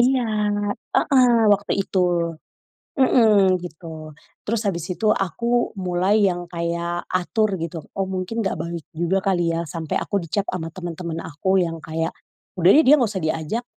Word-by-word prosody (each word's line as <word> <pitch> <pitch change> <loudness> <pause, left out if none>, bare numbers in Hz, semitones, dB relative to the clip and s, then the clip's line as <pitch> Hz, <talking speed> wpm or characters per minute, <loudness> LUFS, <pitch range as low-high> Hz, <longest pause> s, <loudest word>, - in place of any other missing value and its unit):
iya, 255 +1 +3 0.7
heeh, 255 -3 +4 0.2
waktu 200 0 0
itu, 190 - -3 1.0
mhm, 210 -8 +5
gitu. 160 -2 -9 0.3
Terus 225 0 -1
habis 170 -3 -2
itu 215 +4 -1
aku 235 +6 0
mulai 185 +4 +1
yang 175 -1 -3
kayak 170 0 -3
atur 195 +2 0
gitu, 165 0 -4 0.2
"Oh 195 - 0
mungkin 190 +5 -3
nggak 195 - -1
baik 170 -1 -5
juga 175 +3 +1
kali 175 -3 +1
ya," 170 +1 -2
sampai 160 0 -4
aku 200 - -2
dicap 195 +5 -1
sama 165 -3 -3
temen-temen 170 -2 -5
aku 190 +5 0
yang 165 -2 -2
kayak, 165 +1 -3 0.5
udah 175 +1 +4
deh 315 - +6
dia 285 - +7
nggak 235 - +2
usah 190 -5 -4
diajak, 160 +9 -2
180 Hz, 155 wpm, -22 LUFS, 170-210 Hz, 1.0 s, dia